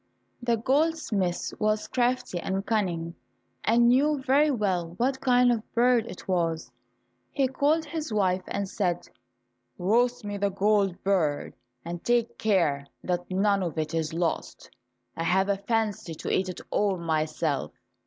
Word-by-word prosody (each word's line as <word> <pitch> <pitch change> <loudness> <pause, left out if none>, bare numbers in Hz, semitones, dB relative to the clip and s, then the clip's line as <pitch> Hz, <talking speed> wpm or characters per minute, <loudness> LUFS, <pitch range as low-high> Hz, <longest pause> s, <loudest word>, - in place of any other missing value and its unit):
The 235 -1 +1
goldsmith 255 - 0
was 215 0 +1
crafty 250 -6 0
and 195 +3 -2
cunning, 175 -7 -1 0.5
and 235 +1 +4
knew 285 +5 +4
very 275 +3 +3
well 185 - -1
what 265 +4 0
kind 250 -1 +4
of 235 - +1
a - - -15
bird 240 -1 +3
it 180 - -10
was. 165 -3 -1 0.6
He 275 -2 +1
called 290 +5 +1
his 315 -5 -5
wife 190 -3 +1
and 200 -1 -2
said, 180 -3 -1 0.7
"Roast 235 +5 +1
me 205 -1 -4
the 200 0 +1
gold 195 -2 +1
bird, 165 -7 0 0.3
and 170 0 -6
take 240 -1 +1
care 165 -10 +1 0.2
that 175 -1 -2
none 200 +1 +2
of 170 -3 -3
it 155 0 -2
is 160 -1 -1
lost. 165 0 -3 0.4
I 165 - -3
have 190 +3 +2
a 200 - +2
fancy 205 -5 -2
to - - -4
eat 185 0 +1
it 180 - -6
all 200 -2 +1
myself." 155 -2 -1
200 Hz, 155 wpm, -27 LUFS, 175-240 Hz, 0.7 s, and